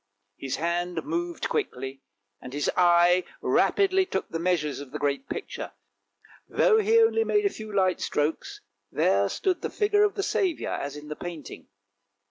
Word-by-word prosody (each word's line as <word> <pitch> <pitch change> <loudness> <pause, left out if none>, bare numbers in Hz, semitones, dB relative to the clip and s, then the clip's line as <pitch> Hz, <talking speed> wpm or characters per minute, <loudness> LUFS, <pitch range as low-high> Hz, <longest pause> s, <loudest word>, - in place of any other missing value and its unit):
His 135 -2 -4
hand 170 0 -2
moved 345 -1 -3
quickly, 135 - -3 0.4
and 125 - -9
his 145 0 0
eye 175 0 +5 0.2
rapidly 385 -1 +3
took 375 - -3
the 165 - -3
measures 165 -5 0
of 140 -2 -9
the 145 - -5
great 145 - -2
picture; - - -6 0.8
though 440 -2 +4
he 440 +2 +3
only 450 0 +4
made 415 -2 +1
a 400 - +2
few 215 -1 -8
light 190 -2 +1
strokes, 150 +2 -2 0.3
there 100 0 +2
stood 370 -2 -1
the - - -3
figure 415 -1 +2
of 415 -1 +1
the 395 - -2
Saviour, 370 -5 -1
as 140 +1 -4
in 150 0 -10
the 150 - -5
painting. 170 -3 -8
180 Hz, 165 wpm, -26 LUFS, -, 0.8 s, eye